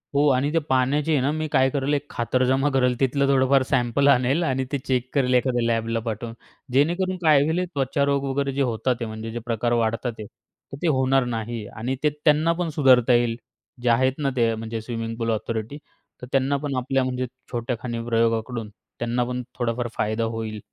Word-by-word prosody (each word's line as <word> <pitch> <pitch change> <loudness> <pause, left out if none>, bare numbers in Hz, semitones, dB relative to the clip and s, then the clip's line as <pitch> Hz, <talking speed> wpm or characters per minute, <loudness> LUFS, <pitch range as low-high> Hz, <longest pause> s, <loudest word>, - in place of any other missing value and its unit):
हो. 145 +1 +4
आणि 135 +3 +1
ते 165 - +3
पाण्याचे 140 +4 +2
आहे 145 - +3
ना, 135 +3 +1
मी 155 0 -2
काय 130 -2 +4
करेल, 140 +1 -1
एक 145 0 -1
खातरजमा 130 +3 +1
करेल. 125 -2 +2
तिथलं 140 +1 +2
थोडंफार 135 0 +4
सॅम्पल 125 +3 +2
आणेल 135 +4 +3
आणि 130 -4 0
ते 140 - 0
चेक 125 -1 0
करेल, 130 -3 +2
एखाद्या 125 -1 +2
लॅबला 115 0 0
पाठवून. 115 +1 -4 0.4
जेणेकरून 175 +7 +1
काय 150 -3 +6
होईल 165 +4 0
त्वचारोग 140 +1 +1
वगैरे 140 +1 -1
जे 140 - -1
होतात 120 -1 -2
आहे, 125 - -1
ते 115 - -2
म्हणजे 110 0 -6
जे 120 - -4
प्रकार 120 0 -1
वाढतात, 115 +2 -1 0.6
तर 140 - -7
ते 175 - 0
होणार 130 -2 +2
नाही 115 -2 -4
आणि 120 +6 -4
ते 150 - +4
त्यांना 155 +2 +4
पण 170 0 -2
सुधारता 130 -5 +4
येईल. 120 -1 +2 0.5
जे 120 - +1
आहेत 130 +3 +3
ना, 140 -2 0
ते 115 -2 +2
म्हणजे 110 0 -5
स्विमिंग 115 0 -4
पूल 115 -1 -1
ऑथॉरिटी, 110 +4 -3 0.4
तर 125 - -7
त्यांना 135 +1 +2
पण 140 -1 -3
आपल्या 135 +1 0
म्हणजे 130 0 -2 0.3
छोट्याखानी 120 -1 -3
प्रयोगाकडून, 115 -1 0 0.3
त्यांना 120 +1 0
पण 125 +1 -3 0.2
थोडाफार 120 0 -1
फायदा 110 +2 0
होईल. 110 -1 -4
125 Hz, 190 wpm, -24 LUFS, 115-140 Hz, 0.6 s, काय